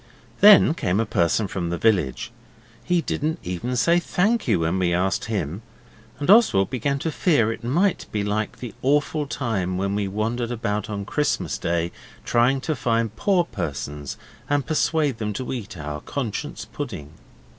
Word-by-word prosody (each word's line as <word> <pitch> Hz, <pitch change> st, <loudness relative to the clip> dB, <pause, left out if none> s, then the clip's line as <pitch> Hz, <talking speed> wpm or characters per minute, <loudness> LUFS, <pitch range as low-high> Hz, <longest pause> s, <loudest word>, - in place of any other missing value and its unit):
Then 205 Hz, -6 st, +8 dB
came 100 Hz, -, 0 dB
a 115 Hz, -, +1 dB
person 100 Hz, +1 st, +1 dB
from 90 Hz, -3 st, -3 dB
the 85 Hz, -, -2 dB
village 90 Hz, -, +1 dB, 0.5 s
he 180 Hz, -1 st, +1 dB
didn't 155 Hz, 0 st, -2 dB
even 90 Hz, +8 st, -3 dB
say 170 Hz, +8 st, +3 dB
'Thank 205 Hz, +5 st, 0 dB
you' 105 Hz, -8 st, +2 dB
when 85 Hz, +3 st, 0 dB
we 85 Hz, -2 st, +2 dB
asked 95 Hz, +2 st, 0 dB
him, 95 Hz, -4 st, -3 dB, 0.6 s
and 145 Hz, -, -4 dB
Oswald 190 Hz, -, +5 dB
began 140 Hz, +2 st, 0 dB
to 160 Hz, +4 st, -2 dB
fear 145 Hz, -, +2 dB
it 115 Hz, -, -11 dB
might 175 Hz, +11 st, +1 dB
be 105 Hz, -1 st, -1 dB
like 105 Hz, +1 st, -2 dB
the 120 Hz, -3 st, -7 dB
awful 145 Hz, +2 st, +1 dB
time 95 Hz, -10 st, -2 dB
when 100 Hz, +1 st, -1 dB
we 100 Hz, -1 st, -1 dB
wandered 115 Hz, +4 st, -2 dB
about 105 Hz, -4 st, -2 dB
on 100 Hz, -1 st, -4 dB
Christmas 150 Hz, +7 st, -1 dB
Day 85 Hz, 0 st, -1 dB, 0.3 s
trying 125 Hz, +3 st, +2 dB
to 155 Hz, +2 st, -1 dB
find 115 Hz, -4 st, 0 dB
poor 185 Hz, -, +2 dB
persons 75 Hz, -, -5 dB, 0.3 s
and 145 Hz, -1 st, +1 dB
persuade 155 Hz, -5 st, +1 dB
them 105 Hz, -1 st, -2 dB
to 130 Hz, +5 st, -4 dB
eat 105 Hz, -7 st, -6 dB
our 75 Hz, -1 st, -5 dB
Conscience 140 Hz, +3 st, -4 dB
pudding. 95 Hz, -, -7 dB
115 Hz, 165 wpm, -23 LUFS, 95-145 Hz, 0.6 s, Then